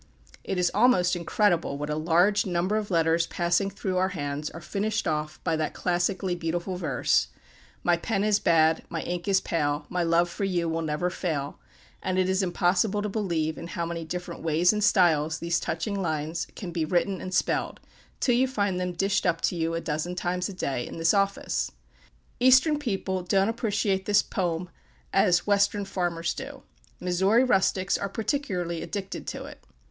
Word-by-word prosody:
It 195 - -3
is 180 -1 +2
almost 195 -5 +4
incredible 175 -4 +1
what 150 +1 -4
a - - 0
large 175 +6 +3
number 180 +2 0
of 215 -1 -2
letters 165 -1 +2
passing 175 +3 +1
through 190 -1 -3
our 185 +1 +2
hands 145 0 -3
are 165 - -9
"finished 210 +4 -2
off" 150 0 -2
by 165 - +1
that 155 -1 -2
classically 180 +1 0
beautiful 175 +2 -3
verse 155 -8 +1 0.6
"My 175 -1 +3
pen 200 +3 -1
is 210 -1 +3
bad, 160 -1 +3
my 165 - -3
ink 175 +1 -4
is 195 -1 +4
pale; 150 -4 -1
my 180 0 -1
love 170 +1 +3
for 175 +4 -5
you 180 -3 0
will 165 0 -1
never 160 +3 -1
fail" 155 -6 -3 0.4
and 185 0 -1
it 185 -1 +2
is 190 +1 +1
impossible 190 +3 +1
to 210 - -2
believe 170 -7 -1
in - - -7
how 170 0 -3
many 170 0 -4
different 175 +1 -6
ways 165 +4 +3
and 210 0 -1
styles 160 -6 +3
these 170 +1 0
touching 200 -3 -2
lines 160 0 -2
can 185 -5 -6
be 165 -1 -1
written 180 +3 0
and 185 - -5
spelled, 185 - 0 0.4
till 245 - +2
you 255 +2 +3
find 205 -7 -1
them 180 0 -2
dished 195 +2 +1
up 165 -1 +1
to - - 0
you 165 0 -1
a 165 - -2
dozen 160 +3 -3
times 180 +1 -2
a - - -6
day, 135 -9 -3
in - - -8
this 165 0 +3
office. 195 -1 0 0.7
Eastern 260 +4 +5
people 195 -8 -2
don't 195 +3 +2
appreciate 205 -4 -1
this 205 0 +4
"pome" 175 -2 -2 0.5
as 175 - +3
Western 205 0 +2
farmers 175 -3 -2
do. - - -8 0.4
Missouri 190 +7 +3
rustics 195 -5 +2
are 200 - -2
particularly 190 - -2
addicted 195 -2 -5
to - - -5
it. - - -12
180 Hz, 185 wpm, -27 LUFS, 165-200 Hz, 0.7 s, Eastern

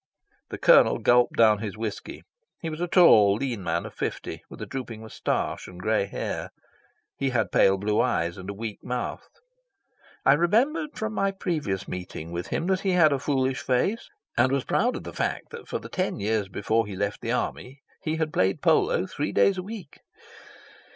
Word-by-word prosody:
The - - -5
Colonel - - +6
gulped 120 0 +3
down 110 -2 +5
his 110 0 -5
whisky. 110 -2 -5 0.4
He 165 - -4
was 155 +2 -6
a 175 - 0
tall, 110 - +6
lean 120 -4 -3
man 85 -1 -1
of - - -8
fifty, - - -4
with - - -11
a - - -5
drooping 120 -4 -6
moustache 110 -1 -3
and 90 - -11
grey 110 +1 +1
hair. 100 - -4 0.7
He 135 - 0
had 120 -4 0
pale 95 0 +4
blue 105 +2 +1
eyes 85 +1 0
and 95 +1 -8
a - - -3
weak 110 0 -6
mouth. 125 0 -3 1.0
I 135 - +7
remembered 235 - +1
from 220 0 -3
my 195 -1 +1
previous 155 - -3
meeting 90 -2 -6
with 85 0 -4
him 165 - -2
that 190 0 +1
he 195 -1 0
had 160 -5 +5
a 140 - 0
foolish 135 -2 0
face, 130 - 0 0.3
and 130 - +3
was 135 -1 +1
proud - - +1
of - - -6
the - - -8
fact - - -3
that - - -9
for - - -2
the - - -9
ten - - -2
years 105 0 0
before 110 +3 0
he 100 - -6
left 100 +2 -2
the 115 - -2
army 130 +2 -3 0.2
he 155 0 -2
had 160 -1 -2
played 95 +1 +1
polo - - +3
three 145 +9 -3
days 195 -2 +3
a - - -4
week. 200 -6 -9
125 Hz, 195 wpm, -26 LUFS, 100-160 Hz, 1.0 s, I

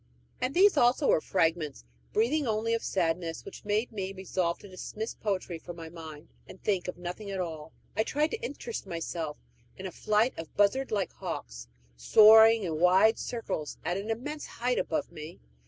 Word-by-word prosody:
And 255 +2 -1
these 385 -2 +6
also 255 +2 +4
were - - +4
fragments, 160 - 0 0.3
breathing 265 +6 +1
only 220 +1 0
of 230 - 0
sadness, 165 -2 -1
which 195 - -10
made 210 +4 0
me 195 -3 -4
resolve 185 -2 -1
to - - -13
dismiss 210 +4 -6
poetry 185 -5 -3
from 175 +1 -9
my 165 -1 -8
mind 160 -2 -10 0.2
and 185 - -12
think 190 -4 -1
of 180 - -5
nothing 180 +4 -6
at 195 -1 -3
all. 160 -3 -5 0.2
I 215 - +2
tried 300 +7 0
to 455 - -4
interest 470 - -5
myself 165 -3 -4 0.4
in 190 - -7
a 185 - -4
flight 215 +7 +1
of 165 - -9
buzzard 235 +7 +3
like 200 -3 -1
hawks, - - -6 0.3
soaring 220 - +7
in 160 -4 -2
wide 185 +6 +5
circles 225 -10 -4
at 175 - 0
an 200 +3 -4
immense 295 +7 -4
height 250 +1 -1
above 300 - -2
me. 155 0 -9
195 Hz, 180 wpm, -29 LUFS, 170-225 Hz, 0.4 s, soaring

